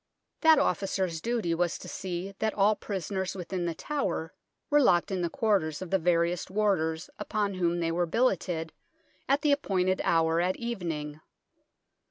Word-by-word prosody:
That 320 -1 +7
officer's 190 - 0
duty 230 -7 0
was 175 0 0
to - - -10
see 185 +1 -5
that 220 0 0
all 210 +1 +4
prisoners 190 -1 -3
within 180 -1 -3
The 165 - -2
Tower 190 - -2 0.4
were 295 0 +6
locked 175 -8 +3
in 185 -2 -1
the 170 - 0
quarters 185 -8 0
of 185 -2 -7
the 190 - +3
various 170 0 +1
warders 185 -6 0
upon 210 -1 -1
whom 175 -2 0
they 165 0 0
were 175 +1 0
billeted 175 -6 0 0.6
at 275 +1 +3
the 295 - +4
appointed 190 -9 +1
hour 165 0 +3
at 185 +1 +1
evening. 165 -10 -4
185 Hz, 160 wpm, -29 LUFS, 170-210 Hz, 0.6 s, That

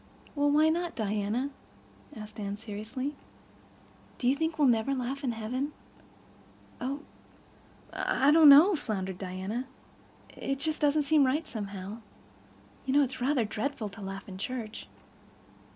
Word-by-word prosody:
"Well, 290 -1 +2
why 305 +2 +5
not, 340 +1 -1
Diana?" 215 +5 -1 0.6
asked 215 0 -9
Anne 200 -1 -3
seriously. 225 +6 -5 1.0
"Do 245 - -1
you 260 - +4
think 320 +2 -1
we'll 295 -3 +4
never 240 +3 +2
laugh 265 +3 -3
in 250 -3 0
heaven?" 250 +6 -3 1.1
"Oh—I—I 275 0 -3
don't 310 -1 +8
know" 320 +8 +9
floundered 190 - -3
Diana. 190 +6 -4 0.7
"It 275 - -2 0.2
doesn't 295 0 +3
seem 300 +1 +4
just 260 -2 +4
right, 305 +4 -2
somehow. 200 -1 -6 0.9
You 260 - +1
know 290 - +6
it's 265 -1 -4
rather 260 -2 +2
dreadful 220 +1 -3
to 200 +2 -12
laugh 195 +1 -6
in 190 -1 -8
church." 230 -1 -5
250 Hz, 135 wpm, -29 LUFS, 210-285 Hz, 1.1 s, know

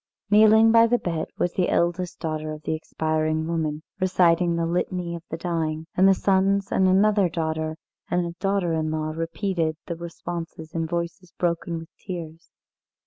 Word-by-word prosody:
Kneeling 220 +1 +7
by 230 0 +6
the 245 +1 +3
bed 165 -7 -3
was 175 - 0
the 185 - +1
eldest 175 +1 0
daughter 155 -1 -3
of 155 0 -10
the - - -1
expiring 155 0 -1
woman, 155 -2 -2 0.2
reciting 180 -2 +3
the 170 0 0
Litany 175 0 -1
of 170 - -6
the 160 - -4
Dying, 160 -2 -2
and 190 +1 +5
the 195 - +6
sons 195 +1 +2
and 190 - +3
another 200 0 +4
daughter 160 -1 -2 0.3
and 175 0 +1
a 170 - -4
daughter 195 -4 0
in 160 -1 0
law 155 0 -2
repeated 165 0 -2
the 170 - -4
responses 170 -1 -7
in 165 -1 -1
voices 170 +1 -4
broken 170 -1 -1
with 165 0 -9
tears. 170 -3 -7
170 Hz, 170 wpm, -24 LUFS, 160-185 Hz, 0.3 s, Kneeling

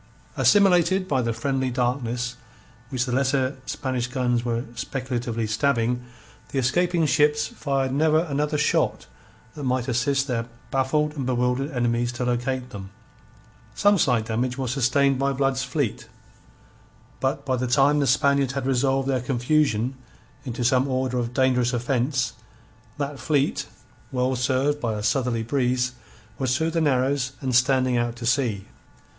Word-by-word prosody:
Assimilated 190 -2 +4
by 135 -6 +1
the 115 -1 -1
friendly 130 +3 -1
darkness 125 0 -1 0.5
which 130 -3 -1
the 125 - -4
lesser 130 +1 +1
Spanish 130 -3 -2
guns 125 -2 0
were 120 -1 -1
speculatively 120 -2 -3
stabbing, 120 +1 0 0.5
the - - -4
escaping 170 +6 +2
ships 150 +1 +3
fired 135 -2 -2
never 155 +2 +3
another 150 -2 -1
shot 150 - +1 0.5
that 145 - -8
might 130 -2 0
assist 135 +2 +1
their 115 -4 -2 0.2
baffled 150 +3 +1
and 135 -4 -3
bewildered 125 +2 0
enemies 120 -3 0
to 125 +1 -3
locate 125 +1 -2
them. 95 -3 -8 0.9
Some 205 -1 +4
slight 120 -7 +2
damage 120 +3 -2
was 130 -3 -2
sustained 135 +1 +2
by 140 0 +1
Blood's 135 0 0
fleet. 125 -3 -2 1.1
But 135 +1 -1
by 130 -1 +1
the 125 0 -2
time 140 +4 +4
the 140 - +1
Spaniards 140 0 +2
had 135 -2 -3
resolved 135 +1 +1
their 130 -2 +1
confusion 125 -1 +1 0.5
into 120 -1 -3
some 130 +2 +3
order 130 -1 -1
of 120 -1 -2
dangerous 125 -1 +2
offence, 125 0 0 0.6
that 140 -1 -4
fleet, 145 -3 0 0.4
well 130 0 0
served 135 +3 0
by 115 -3 -1
a 105 - -4
southerly 120 0 0
breeze, 125 0 0 0.5
was 130 -1 +1
through 160 +2 0
the 165 0 0
narrows 135 -2 +1
and 130 -1 -2
standing 130 -1 +3
out 120 0 -1
to 120 0 -7
sea. 115 -6 0
130 Hz, 150 wpm, -24 LUFS, 125-140 Hz, 1.1 s, Assimilated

